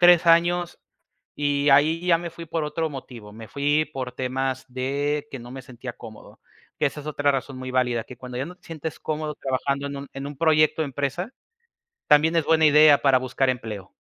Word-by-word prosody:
3 175 -1 +6
años, 175 +1 +3 0.6
y 145 0 +1
ahí 150 +4 +5
ya 170 -2 +5
me 170 0 -6
fui 165 0 -10
por 160 0 -2
otro 160 +2 -2
motivo, 125 -7 -10
me 110 +1 -11
fui 145 +2 +1
por 130 -2 -5
temas 130 0 -2
de 145 +3 -1
que 135 - -6
no 120 - -11
me 130 0 -8
sentía 125 0 -8
cómodo, 110 -2 -13 0.4
que 150 - +2
esa 150 - -4
es 150 - -12
otra 145 -1 +1
razón 135 -1 -4
muy 130 0 -6
válida, 125 -3 +1
que 125 - -12
cuando 125 0 -7
ya 130 - -1
no 180 - -9
te - - -37
sientes 160 -1 -6
cómodo 155 -1 -3
trabajando 140 +1 -2
en 140 - -6
un 140 0 -7
en 135 +1 -6
un 145 - -9
proyecto 155 0 +3
o - - -1
empresa, 145 - -3 0.8
también 155 +3 +5
es 165 - +3
buena 160 0 +3
idea 150 -1 +7
para 135 -2 +4
buscar 130 +1 0
empleo. 110 -6 -5
140 Hz, 210 wpm, -24 LUFS, 130-155 Hz, 0.8 s, idea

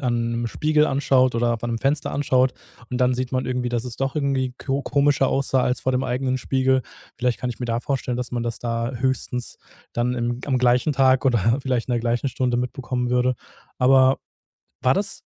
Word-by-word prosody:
an 120 -1 0
'nem 115 0 -2
Spiegel 150 +4 +2
anschaut 135 -2 +2
oder 120 0 +2
an 120 - -2
'nem 115 - -2
Fenster 140 +3 0
anschaut 130 -2 +2 0.4
und 125 - -2
dann 125 0 +3
sieht 130 +1 -3
man 130 0 0
irgendwie, 125 -1 -1
dass 120 0 -2
es 125 - -6
doch 135 +1 -2
irgendwie 135 -3 0
ko 140 0 -2
komischer 140 -1 +2
aussah 135 -1 +1
als 125 - 0
vor 130 - 0
dem 130 +1 0
eigenen 130 +1 -1
Spiegel. 130 0 +1 0.3
Vielleicht 125 -1 0
kann 125 - -2
ich 120 - -8
mir 120 - -2
da 115 0 -1
vorstellen, 130 -3 -2
dass 125 0 -4
man 120 -1 -1
das 115 -1 -3
da 115 +1 -2
höchstens 125 -1 -2 0.4
dann 120 +1 0
im 120 0 -2
am 130 -3 +1
gleichen 125 +4 +3
Tag 130 -1 +3
oder 120 0 +3
vielleicht 130 -2 -1
in - - 0
der 120 - +1
gleichen 120 +3 0
Stunde 125 -1 -1
mitbekommen 125 0 -2
würde. 125 0 +2 0.4
Aber 130 +1 +5 0.6
war - - +4
das, - - -3
125 Hz, 205 wpm, -23 LUFS, 120-135 Hz, 0.6 s, Aber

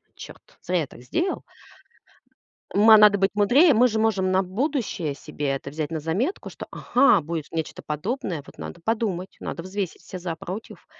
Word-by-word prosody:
"Черт, - - -13
зря 180 -1 0
я 145 - -3
так - - -14
сделал". 340 - -2 1.3
Ма 220 +2 +8
надо 210 -1 +7
быть 195 +1 +2
мудрее. 260 - +5
Мы 245 +2 +5
же 220 -1 -1
можем 195 -4 +1
на 190 - +3
будущее 210 - -2
себе 145 -1 -5
это 135 0 -3
взять 150 +2 -4
на 160 - -2
заметку, 190 - -2
что: - - -9
"Ага, 245 -7 +4
будет 160 0 -5
нечто 160 -1 -4
подобное, 165 - -3
вот - - -15
надо 170 - -8
подумать, 200 -3 -2
надо 170 - -5
взвесить 190 -1 -4
все 185 - -8
за, 175 -2 -4
против". 185 +7 -8
190 Hz, 175 wpm, -24 LUFS, 160-225 Hz, 1.3 s, Ма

